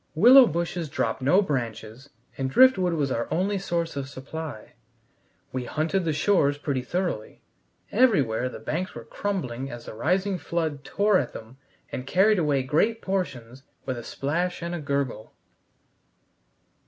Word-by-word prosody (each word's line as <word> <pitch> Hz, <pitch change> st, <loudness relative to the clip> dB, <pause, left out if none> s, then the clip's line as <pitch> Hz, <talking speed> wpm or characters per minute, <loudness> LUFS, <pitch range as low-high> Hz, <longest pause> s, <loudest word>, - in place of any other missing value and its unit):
Willow 250 Hz, -, +8 dB
bushes 170 Hz, 0 st, -2 dB
drop 115 Hz, -3 st, -2 dB
no 180 Hz, +10 st, +4 dB
branches, 120 Hz, -, -4 dB, 0.3 s
and 135 Hz, -1 st, -2 dB
driftwood 190 Hz, -, +5 dB
was 145 Hz, -4 st, 0 dB
our 115 Hz, -1 st, -1 dB
only 195 Hz, +3 st, 0 dB
source 170 Hz, -4 st, -2 dB
of 135 Hz, -1 st, -4 dB
supply. 140 Hz, -2 st, -8 dB, 0.8 s
We 130 Hz, -1 st, -3 dB
hunted 165 Hz, +7 st, -1 dB
the 160 Hz, -, +1 dB
shores 145 Hz, -3 st, +2 dB
pretty 140 Hz, -3 st, -2 dB
thoroughly. 175 Hz, -, -3 dB, 0.5 s
Everywhere 140 Hz, -, +3 dB
the -, -, -8 dB
banks 180 Hz, +5 st, -4 dB
were -, -, -7 dB
crumbling 135 Hz, -11 st, -3 dB
as 120 Hz, -2 st, -9 dB
the -, -, -8 dB
rising 185 Hz, -, 0 dB
flood 160 Hz, -5 st, -2 dB
tore 200 Hz, +2 st, +2 dB
at -, -, -4 dB
them 115 Hz, +4 st, -10 dB, 0.3 s
and 130 Hz, 0 st, -5 dB
carried 195 Hz, +5 st, +4 dB
away 145 Hz, -5 st, +1 dB
great 185 Hz, -, +1 dB
portions 135 Hz, -11 st, -3 dB, 0.2 s
with 130 Hz, -, -2 dB
a 120 Hz, -, -7 dB
splash 170 Hz, +9 st, -2 dB
and 170 Hz, +1 st, -3 dB
a 175 Hz, -, -3 dB
gurgle. 140 Hz, -7 st, -3 dB
155 Hz, 150 wpm, -26 LUFS, 130-185 Hz, 0.8 s, Willow